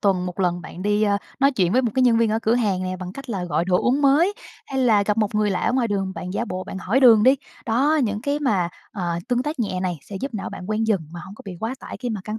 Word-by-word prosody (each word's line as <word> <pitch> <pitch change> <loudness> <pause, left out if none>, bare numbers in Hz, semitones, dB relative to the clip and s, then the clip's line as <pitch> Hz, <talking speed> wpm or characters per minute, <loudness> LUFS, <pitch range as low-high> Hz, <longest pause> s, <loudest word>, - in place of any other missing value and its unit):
tuần 185 -3 +1
1 180 +2 -5
lần 175 -1 +1
bạn 175 +2 -9
đi, 210 +1 +1
a, 200 -1 +2 0.2
nói 275 +1 +4
chuyện 185 -6 +1
với 255 +3 +3
một 235 - 0
cái 260 - +3
nhân 240 -2 +5
viên 230 -2 +2
ở 220 - +1
cửa 225 0 +1
hàng 205 -6 0
nè 185 0 -3
bằng 180 0 -7
cách 275 +1 -9
là 190 -4 -2
gọi 170 -1 0
đồ 180 0 +2
uống 270 +4 +2
mới, 320 +9 +4 0.3
hay 265 - -3
là 220 -5 +4
gặp 210 +1 0
một 210 -1 0
người 210 -1 +2
lạ 180 -2 -1
ở - - +1
ngoài 250 -2 +1
đường 195 -2 -1
bạn 180 - -6
giả 235 - -1
bộ 185 -4 -5
bạn 190 - -6
hỏi 225 +8 +1
đường 230 -5 +7
đi. 260 +4 +6 0.3
Đó 280 +8 +2
những 210 -2 -2
cái 285 +2 0
mà, 200 -12 +1 0.2
ờ, 175 -4 -2
tương 245 0 +1
tác 295 0 -4
nhẹ 185 -5 -1
này 180 -3 -2
sẽ 200 - -8
giúp 265 -2 -4
não 200 - -4
bạn 185 +3 -7
quen 220 +1 0
dần 210 -5 +2
mà 170 +1 -8
hông 195 - -10
có - - -13
bị 195 - -6
quá 225 +4 -2
tải - - -8
khi 245 -2 -4
mà 215 -3 -3
căng 215 +1 -4
210 Hz, 310 wpm, -23 LUFS, 185-245 Hz, 0.3 s, đường